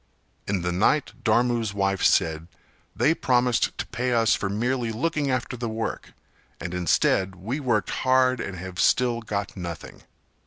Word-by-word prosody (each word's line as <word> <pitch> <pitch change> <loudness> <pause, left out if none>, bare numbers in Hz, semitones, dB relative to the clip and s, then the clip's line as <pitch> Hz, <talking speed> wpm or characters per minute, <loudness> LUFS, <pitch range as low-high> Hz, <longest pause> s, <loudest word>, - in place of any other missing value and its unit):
In 95 -3 -1
the 90 - 0
night 115 +10 +1
Dharmu's 115 -2 +1
wife 100 -1 0
said 80 0 +2 0.5
"They 160 - +3
promised 125 -5 +1
to - - -3
pay 125 +1 -2
us 115 -1 +3
for 95 - -1
merely 120 +3 -1
looking 145 +4 -1
after 130 -1 -1
the 120 -1 -4
work 110 +1 -4 0.5
and 90 -1 -5
instead, 95 +1 +1
we 110 - -4
worked 115 -9 0
hard 130 -1 +3
and 95 -2 -5
have 90 +1 -7
still 120 +4 +2
got 100 -2 -4
nothing. 85 -4 -7
115 Hz, 155 wpm, -25 LUFS, 95-125 Hz, 0.5 s, They